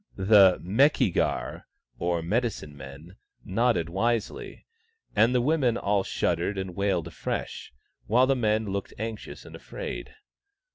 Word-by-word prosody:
The 95 -1 +6
Meki 110 - +3
gar, - - -2 0.3
or 85 -1 -1
medicine 105 -6 -2
men, 70 +6 -11 0.3
nodded 115 -4 +1
wisely, 115 +6 -2 0.5
and 120 +3 +4
the 125 - +3
women 130 -4 +2
all 100 -2 +1
shuddered 90 +3 -1
and 95 -2 -4
wailed 95 -4 0
afresh, 85 - -5 0.4
while 125 +5 +4
the 135 +1 +2
men 110 -2 +1
looked 100 -1 -4
anxious 110 0 -6
and - - -11
afraid. 445 - -7
100 Hz, 130 wpm, -27 LUFS, 90-120 Hz, 0.5 s, The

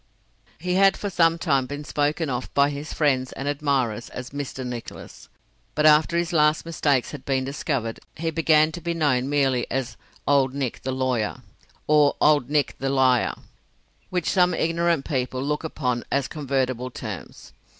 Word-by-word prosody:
He 180 +3 -2
had 195 +1 +4
for 205 - -4
some 165 -2 +3
time 140 -6 +1
been 145 +2 -6
spoken 150 +3 -1
of 125 -2 -3
by 140 +1 +4
his 145 +1 -6
friends 130 -4 +1
and 135 - -5
admirers 135 -6 -1
as 125 0 -8
"Mr. 135 -2 -5
Nicholas," 120 -2 -8 0.5
but 150 - +2
after 155 +2 +5
his 170 0 -1
last 150 0 +3
mistakes 145 -6 0
had 145 -3 -8
been 135 -1 0
discovered, 135 -4 -3 0.2
he 165 +1 -2
began 155 -1 +3
to 175 - -7
be 170 0 -2
known 135 -5 +1
merely 135 -4 +1
as 125 -4 -3 0.3
"Old 135 -2 +3
Nick 135 -4 -3
the 130 - -3
Lawyer," 130 -4 -1 0.4
or 150 -1 +4
"Old 145 -4 +3
Nick 150 -2 +1
the 135 - -1
Liar," 130 -2 +3 0.7
which 180 -2 -2
some 180 -2 +3
ignorant 165 -3 +1
people 130 -3 -2
look 150 +2 -2
upon 125 -6 -2
as 140 -1 +1
convertible 130 -4 -2
terms. 110 -6 -8
140 Hz, 165 wpm, -24 LUFS, 130-155 Hz, 0.7 s, after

